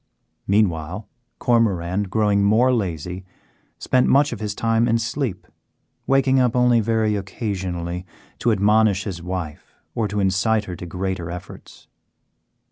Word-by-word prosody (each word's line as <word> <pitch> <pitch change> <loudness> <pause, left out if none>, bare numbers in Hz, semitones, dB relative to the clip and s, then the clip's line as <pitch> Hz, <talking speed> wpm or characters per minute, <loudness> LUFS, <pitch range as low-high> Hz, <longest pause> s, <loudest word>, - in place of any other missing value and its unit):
Meanwhile 95 -1 0 0.3
Cormoran, 100 -5 +1
growing 105 -1 +2
more 115 +6 +4
lazy, 90 -4 -3 0.5
spent 130 0 +2
much 140 -1 +4
of 115 - -7
his 105 -1 -4
time 115 +1 +1
in 115 -1 +3
sleep, 115 -3 -3 0.6
waking 135 0 +3
up 125 -2 +2
only 125 -1 +4
very 110 -1 +1
occasionally 95 -3 -4 0.3
to 120 - +2
admonish 105 0 +3
his 90 -5 -5
wife 90 -4 -6 0.2
or 110 -2 -1
to 105 +1 -3
incite 100 +3 +1
her 90 - -6
to 85 - -8
greater 90 -1 -3
efforts. 90 +1 -10
105 Hz, 130 wpm, -22 LUFS, 90-115 Hz, 0.6 s, more